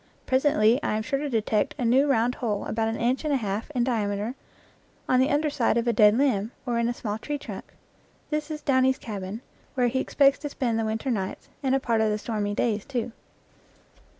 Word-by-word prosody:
Presently 260 -2 +3
I 215 - 0
am 220 - -2
sure 275 +4 -1
to 295 0 -3
de 225 -4 0
tect 215 0 0
a 250 - -1
new 265 +5 +4
round 245 -1 +2
hole 210 -4 -1
about 220 0 -1
an 225 - -1
inch 245 +4 0
and 305 - -1
a - - +3
half 210 0 -3
in 245 - +2
diameter 215 -2 -1 0.7
on 255 - +3
the 260 +3 +3
under 300 0 +1
side 235 -5 +1
of 235 +1 0
a 235 - +3
dead 210 +1 +5
limb, 230 -7 +1 0.2
or 240 -2 0
in 235 0 +1
a - - -1
small 215 -2 -4
tree 295 +5 -3
trunk. - - -9 0.6
This 300 0 -2
is 305 -1 -5
Downy's 260 -1 +3
cabin, 205 -3 -6 0.3
where 250 -2 +2
he 260 - -1
expects 275 +1 +3
to 295 - -4
spend 235 -5 -1
the 225 - 0
winter 220 +4 -2
nights, 195 -5 -4
and 265 -1 +2
a - - +2
part 230 -4 +1
of 220 - +2
the 210 - 0
stormy 210 -2 -2
days, 215 -3 0
too. 245 -3 -3
235 Hz, 225 wpm, -26 LUFS, 215-270 Hz, 0.7 s, dead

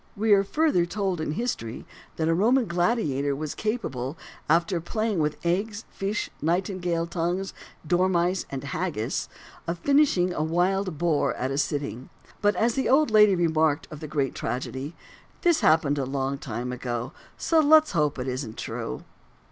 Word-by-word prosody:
We 220 +1 +1
are 195 -1 +5
further 295 - +2
told 190 -3 -2
in 150 - -2
history 145 - -3 0.3
that 160 - -1
a 165 - +3
Roman 235 +8 +3
gladiator 170 - 0
was 150 +1 -4
capable, 160 - -3 0.3
after 170 +2 +2
playing 215 +2 -1
with 150 -1 0
eggs, 205 +5 -1
fish, 200 +2 -2
nightingales' 175 0 -1
tongues, 175 +3 -2 0.3
dormice, 180 +1 +1
and 135 -1 -5
haggis, 150 -5 -2 0.4
of 170 +1 -2
finishing 270 - +3
a - - -2
wild 180 +2 0
boar 165 -2 +1
at 130 +2 -2
a 135 - -2
sitting. 140 -5 -3 0.3
But 205 0 +3
as 230 +1 +2
the 265 - 0
old 290 0 +4
lady 210 -2 +6
remarked 160 -3 +1
of 150 - -8
the 155 - -6
great 140 -3 -1
tragedy, 130 +4 -4 0.5
this 345 -3 +4
happened 150 -2 +3
a 135 - -1
long 135 +1 -2
time 125 -2 -4
ago, 120 -1 -4 0.2
so 330 - +2
let's 310 0 +6
hope 150 -4 +1
it 125 0 -4
isn't 125 -3 -4
true. 65 - -5
170 Hz, 160 wpm, -26 LUFS, 145-200 Hz, 0.5 s, lady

